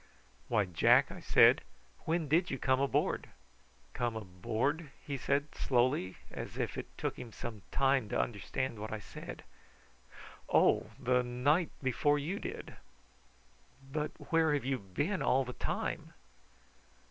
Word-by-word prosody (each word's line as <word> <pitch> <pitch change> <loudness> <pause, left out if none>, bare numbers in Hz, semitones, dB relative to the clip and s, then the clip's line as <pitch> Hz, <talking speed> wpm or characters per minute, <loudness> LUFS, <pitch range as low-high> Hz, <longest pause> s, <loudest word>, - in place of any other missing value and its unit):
"Why, 105 -4 +2
Jack," 90 -4 +4
I - - -8
said, - - +6 0.4
"when 165 -1 0
did 170 +5 +3
you 135 - -2
come 130 0 +2
aboard?" 140 - +1 0.6
"Come 120 -2 -1
aboard?" 115 - -2 0.2
he 140 - -3
said 140 +2 0
slowly, 125 -6 +1
as - - -6
if - - -2
it - - -5
took - - -3
him 120 -2 -8
some 110 -1 -7
time 135 -5 +2
to - - 0
understand 115 +2 -2
what 110 +1 -5
I 110 - -2
said. 100 - -9 1.1
"Oh, - - +4
the 125 0 +3
night 135 +7 +2
before 145 +3 +2
you 165 +8 -2
did." - - -7 1.1
"But 150 +1 -1 0.2
where 160 -2 +4
have 135 -4 -2
you 135 -1 0
been 145 - -2
all 135 0 +3
the 125 - -6
time?" - - -3
130 Hz, 140 wpm, -33 LUFS, 115-145 Hz, 1.1 s, said